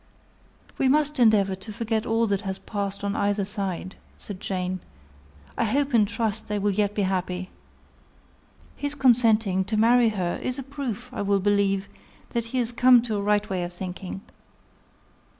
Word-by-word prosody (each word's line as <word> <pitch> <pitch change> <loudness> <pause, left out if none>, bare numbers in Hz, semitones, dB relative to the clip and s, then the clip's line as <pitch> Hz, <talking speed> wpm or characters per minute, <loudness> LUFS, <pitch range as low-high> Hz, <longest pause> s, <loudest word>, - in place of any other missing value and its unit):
"We 265 - +3
must 295 0 +2
endeavour 210 -5 +4
to 190 +3 -8
forget 225 0 -2
all 225 +1 +2
that 200 -2 0
has 190 -2 -3
passed 200 -1 -4
on 200 0 -1
either 200 0 0
side," 195 -2 -4 0.2
said 200 -3 -6
Jane: 185 -1 -3 0.8
"I - - +1
hope 275 +5 0
and 215 -3 +5
trust 220 0 -2
they 210 - -1
will 205 0 +1
yet 205 +1 0
be 205 - +1
happy. 185 -1 -2 1.2
His 285 0 -3
consenting 225 -7 +3
to 215 +2 -1
marry 235 +1 +5
her 185 -5 -2
is 255 - -2
a 270 - -4
proof, 250 -3 -5
I 250 - -3
will 200 0 +2
believe, 200 0 +1 0.4
that 235 -1 -1
he 230 +3 -4
is 240 -1 0
come 245 0 +6
to 225 -3 -2
a 200 - -1
right 210 +1 +1
way 185 -3 -2
of 175 0 -5
thinking. 185 +1 -6
210 Hz, 170 wpm, -25 LUFS, 195-235 Hz, 1.2 s, come